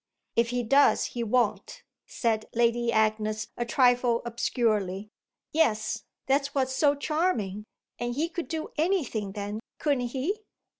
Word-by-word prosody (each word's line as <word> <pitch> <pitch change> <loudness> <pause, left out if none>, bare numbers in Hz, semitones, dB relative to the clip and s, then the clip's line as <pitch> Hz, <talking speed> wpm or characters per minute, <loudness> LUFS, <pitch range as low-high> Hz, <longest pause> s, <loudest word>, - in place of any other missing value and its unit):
"If 235 0 +3
he 245 0 -1
does 275 +5 +4
he 240 - -2
won't," 230 0 0 0.2
said 230 - -1
Lady 235 0 +2
Agnes 215 0 +1
a 240 - -2
trifle 245 -2 +3
obscurely. 215 -4 -1 0.4
"Yes, 220 -8 +1 0.2
that's 275 +1 +1
what's 260 -1 +1
so 290 0 +4
charming. 280 - -1 0.3
And 240 0 -2
he 310 +4 +1
could 340 0 -5
do 320 -1 -4
anything 275 - 0
then, 205 +1 -4 0.2
couldn't 275 -5 0
he?" 285 - -2
240 Hz, 135 wpm, -28 LUFS, 215-285 Hz, 0.4 s, does